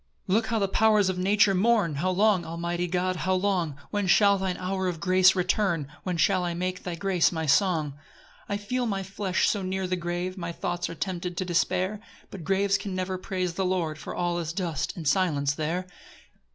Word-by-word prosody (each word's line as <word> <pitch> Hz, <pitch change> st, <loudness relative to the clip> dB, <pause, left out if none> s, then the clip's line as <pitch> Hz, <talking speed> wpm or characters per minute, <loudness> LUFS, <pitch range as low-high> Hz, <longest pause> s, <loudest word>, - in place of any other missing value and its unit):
4 190 Hz, -, +1 dB
Look 220 Hz, 0 st, +1 dB
how 230 Hz, -, 0 dB
the 200 Hz, -2 st, +1 dB
powers 210 Hz, -1 st, +3 dB
of 185 Hz, -1 st, -2 dB
nature 200 Hz, +2 st, +4 dB
mourn! 200 Hz, -3 st, +2 dB
How 180 Hz, +6 st, 0 dB
long, 195 Hz, 0 st, +3 dB
almighty 170 Hz, +1 st, -3 dB
God, 180 Hz, +1 st, -1 dB
how 185 Hz, +3 st, 0 dB
long? 180 Hz, -6 st, 0 dB, 0.2 s
When 205 Hz, -2 st, -1 dB
shall 200 Hz, +1 st, +5 dB
thine 190 Hz, -1 st, -2 dB
hour 190 Hz, 0 st, -2 dB
of 175 Hz, -3 st, -3 dB
grace 185 Hz, +1 st, +5 dB
return? 180 Hz, -5 st, 0 dB
When 180 Hz, -2 st, -3 dB
shall 185 Hz, +2 st, +2 dB
I 175 Hz, -1 st, -2 dB
make 180 Hz, +1 st, -3 dB
thy 175 Hz, -2 st, -4 dB
grace 180 Hz, 0 st, +2 dB
my 160 Hz, -2 st, -3 dB
song? 155 Hz, 0 st, +2 dB
5 140 Hz, -, -17 dB, 0.5 s
I 200 Hz, -, 0 dB
feel 245 Hz, +5 st, -2 dB
my 195 Hz, -3 st, -2 dB
flesh 190 Hz, 0 st, -1 dB
so 205 Hz, -, 0 dB
near 190 Hz, 0 st, -2 dB
the 185 Hz, 0 st, -1 dB
grave, 175 Hz, +2 st, -3 dB
My 170 Hz, -1 st, -4 dB
thoughts 175 Hz, +1 st, -3 dB
are 170 Hz, -, -6 dB
tempted 180 Hz, 0 st, -4 dB
to 185 Hz, -, -1 dB
despair; 185 Hz, +3 st, 0 dB, 0.3 s
But 190 Hz, -4 st, -8 dB
graves 195 Hz, +2 st, +1 dB
can 200 Hz, -2 st, -5 dB
never 185 Hz, 0 st, -2 dB
praise 185 Hz, -2 st, -2 dB
the 190 Hz, -, -1 dB
Lord, 175 Hz, -4 st, -1 dB
For -, -, -7 dB
all 175 Hz, 0 st, -1 dB
is 165 Hz, -1 st, -4 dB
dust 170 Hz, -5 st, -3 dB
and 160 Hz, -3 st, -4 dB
silence 145 Hz, -5 st, +2 dB
there. 165 Hz, +4 st, -2 dB
185 Hz, 210 wpm, -27 LUFS, 170-195 Hz, 0.5 s, shall